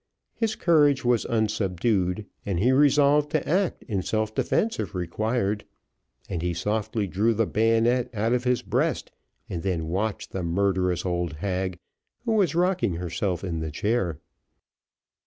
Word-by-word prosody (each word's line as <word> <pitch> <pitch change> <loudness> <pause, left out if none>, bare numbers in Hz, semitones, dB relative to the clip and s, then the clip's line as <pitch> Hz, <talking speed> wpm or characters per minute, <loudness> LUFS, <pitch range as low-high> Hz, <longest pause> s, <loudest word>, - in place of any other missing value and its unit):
His 220 -1 -1
courage 145 -6 +3
was 120 -2 +2
unsubdued, 105 -2 0 0.2
and 100 -4 -2
he 120 +7 +3
resolved 145 +1 +4
to 155 - 0
act 185 +2 0
in 100 -6 -2
self 110 +3 -1
defence 225 - 0
if - - -4
required; 105 +4 -1 0.6
and 85 - -3
he 85 0 -1
softly 105 +3 -1
drew 105 +6 +1
the 115 +1 +2
bayonet 115 +3 +2
out 115 +1 0
of 125 0 +1
his 125 -1 +1
breast, - - -1 0.4
and 85 - -4
then 85 -4 -2
watched 100 +4 -2
the 95 - -3
murderous 90 0 0
old 85 -2 -1
hag, 95 +2 -2 0.5
who 230 - 0
was 195 -9 +2
rocking 175 - +1
herself 90 +1 -2
in 85 -4 -3
the 80 0 -3
chair. 95 0 -1
105 Hz, 150 wpm, -26 LUFS, 90-125 Hz, 0.6 s, resolved